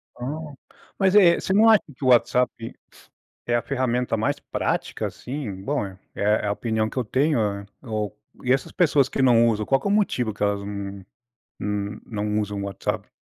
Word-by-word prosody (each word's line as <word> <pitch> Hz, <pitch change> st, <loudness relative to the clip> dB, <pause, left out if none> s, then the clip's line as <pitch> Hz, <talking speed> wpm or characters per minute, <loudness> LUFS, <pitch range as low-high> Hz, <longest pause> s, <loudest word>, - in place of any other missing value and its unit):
Ah, 150 Hz, +4 st, -5 dB, 0.4 s
mas 190 Hz, 0 st, +3 dB
é, 180 Hz, -5 st, +7 dB
você 190 Hz, -, -1 dB
não 220 Hz, +3 st, +6 dB
acha 220 Hz, -2 st, +6 dB
que 135 Hz, -, -11 dB
o -, -, +1 dB
WhatsApp 125 Hz, -1 st, +2 dB, 0.7 s
é 120 Hz, -, +1 dB
a 120 Hz, -, +2 dB
ferramenta 125 Hz, -2 st, 0 dB
mais 110 Hz, -, 0 dB
prática -, -, -2 dB
assim, 120 Hz, -8 st, -6 dB
bom, 140 Hz, -2 st, -1 dB
é 95 Hz, -1 st, -9 dB, 0.2 s
é 105 Hz, +1 st, +1 dB
a -, -, +1 dB
opinião 110 Hz, 0 st, -1 dB
que -, -, -12 dB
eu 130 Hz, -, +1 dB
tenho 140 Hz, +5 st, +1 dB
é 100 Hz, -2 st, -1 dB, 0.2 s
o, 110 Hz, -4 st, -3 dB, 0.3 s
e 125 Hz, -, +1 dB
essas 135 Hz, -1 st, -1 dB
pessoas 145 Hz, -6 st, +3 dB
que -, -, -1 dB
não 120 Hz, -3 st, +5 dB
usam 105 Hz, -2 st, 0 dB
qual 135 Hz, +4 st, +3 dB
que 200 Hz, -, -4 dB
é -, -, +1 dB
o -, -, +3 dB
motivo 125 Hz, -, +1 dB
que 100 Hz, -, -4 dB
elas, 100 Hz, 0 st, +1 dB
hum 100 Hz, -1 st, -6 dB, 0.6 s
hum, 105 Hz, +1 st, -3 dB
não 105 Hz, -1 st, -2 dB
usam 105 Hz, -1 st, -3 dB
o -, -, -3 dB
WhatsApp? 100 Hz, -1 st, -4 dB
115 Hz, 200 wpm, -24 LUFS, 105-135 Hz, 0.7 s, é